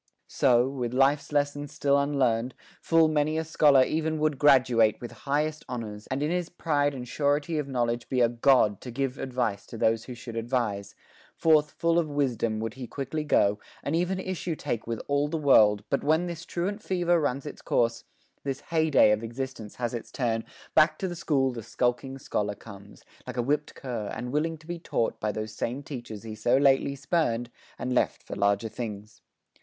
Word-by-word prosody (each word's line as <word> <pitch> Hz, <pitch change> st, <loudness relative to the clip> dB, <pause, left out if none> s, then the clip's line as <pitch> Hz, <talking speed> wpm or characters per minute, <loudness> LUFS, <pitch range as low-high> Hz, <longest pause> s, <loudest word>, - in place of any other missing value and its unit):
So, 125 Hz, -2 st, +3 dB
with 125 Hz, -3 st, -3 dB
life's 140 Hz, +3 st, +2 dB
lessons 145 Hz, 0 st, -1 dB
still 140 Hz, -1 st, +2 dB
unlearned 130 Hz, -4 st, +1 dB, 0.3 s
Full 165 Hz, -1 st, +4 dB
many 155 Hz, 0 st, +1 dB
a 160 Hz, -, 0 dB
scholar 150 Hz, -4 st, +5 dB
e'en 160 Hz, 0 st, -1 dB
would 155 Hz, -3 st, 0 dB
graduate 125 Hz, -6 st, +4 dB
With 120 Hz, -, -7 dB
highest 150 Hz, +6 st, -2 dB
honors, 110 Hz, -4 st, -6 dB
and 130 Hz, +2 st, -2 dB
in 150 Hz, -, 0 dB
his 180 Hz, -1 st, -1 dB
pride 145 Hz, -5 st, 0 dB
And 125 Hz, -1 st, -6 dB
surety 145 Hz, +4 st, 0 dB
of 145 Hz, -, -3 dB
knowledge 120 Hz, -3 st, -1 dB
be 130 Hz, -, 0 dB
a 120 Hz, -, +5 dB
god 120 Hz, -4 st, +3 dB
To 125 Hz, -, -8 dB
give 135 Hz, +2 st, -2 dB
advice 125 Hz, -6 st, -2 dB
to 115 Hz, -, -8 dB
those 110 Hz, 0 st, +1 dB
who 125 Hz, -, -7 dB
should 115 Hz, -1 st, -9 dB
advise; 115 Hz, -4 st, -2 dB, 0.4 s
Forth 155 Hz, -2 st, +4 dB
full 170 Hz, 0 st, +1 dB
of 160 Hz, -3 st, -1 dB
wisdom 120 Hz, -6 st, 0 dB
would 115 Hz, 0 st, -3 dB
he 130 Hz, -1 st, -7 dB
quickly 145 Hz, +4 st, -4 dB
go, 105 Hz, -8 st, +2 dB, 0.2 s
And 145 Hz, -, -1 dB
even 180 Hz, +3 st, 0 dB
issue 185 Hz, -3 st, -3 dB
take 120 Hz, -8 st, -4 dB
with 115 Hz, -1 st, -3 dB
all 145 Hz, +1 st, +1 dB
the 165 Hz, +2 st, -2 dB
world, 110 Hz, -9 st, +5 dB
But 140 Hz, -, +1 dB
when 160 Hz, +4 st, +2 dB
this 170 Hz, -2 st, -6 dB
truant 200 Hz, +5 st, -3 dB
fever 175 Hz, -3 st, +1 dB
runs 140 Hz, -2 st, -1 dB
its 150 Hz, -, -8 dB
course, 115 Hz, -1 st, 0 dB, 0.4 s
This 135 Hz, 0 st, -3 dB
hey 160 Hz, -1 st, 0 dB
day 135 Hz, -7 st, +6 dB
of 105 Hz, 0 st, +1 dB
existence 120 Hz, -2 st, -6 dB
has 120 Hz, -1 st, -3 dB
its 120 Hz, -, -6 dB
turn, 115 Hz, -3 st, -1 dB, 0.3 s
Back 155 Hz, 0 st, +5 dB
to 190 Hz, -, -2 dB
the 175 Hz, -, -5 dB
school 135 Hz, -5 st, +1 dB
the 120 Hz, -2 st, -6 dB
skulking 125 Hz, +4 st, -1 dB
scholar 105 Hz, -5 st, -2 dB
comes, 100 Hz, -1 st, -13 dB, 0.2 s
Like 125 Hz, 0 st, -6 dB
a 120 Hz, -, +1 dB
whipped 150 Hz, +4 st, -1 dB
cur, 120 Hz, -6 st, -4 dB
and 125 Hz, 0 st, -5 dB
willing 160 Hz, +3 st, 0 dB
to 155 Hz, -, -19 dB
be 175 Hz, +1 st, -5 dB
taught 115 Hz, -7 st, -1 dB
By 105 Hz, -, -1 dB
those 110 Hz, +1 st, -5 dB
same 125 Hz, +5 st, -3 dB
teachers 120 Hz, -7 st, -7 dB
he 110 Hz, -1 st, -6 dB
so 120 Hz, +4 st, +2 dB
lately 140 Hz, 0 st, +3 dB
spurn'd, 135 Hz, -5 st, -1 dB, 0.3 s
And 125 Hz, 0 st, -2 dB
left 125 Hz, -, +1 dB
for -, -, -7 dB
larger 100 Hz, +2 st, +1 dB
things. 105 Hz, -2 st, -7 dB
135 Hz, 195 wpm, -27 LUFS, 115-150 Hz, 0.4 s, day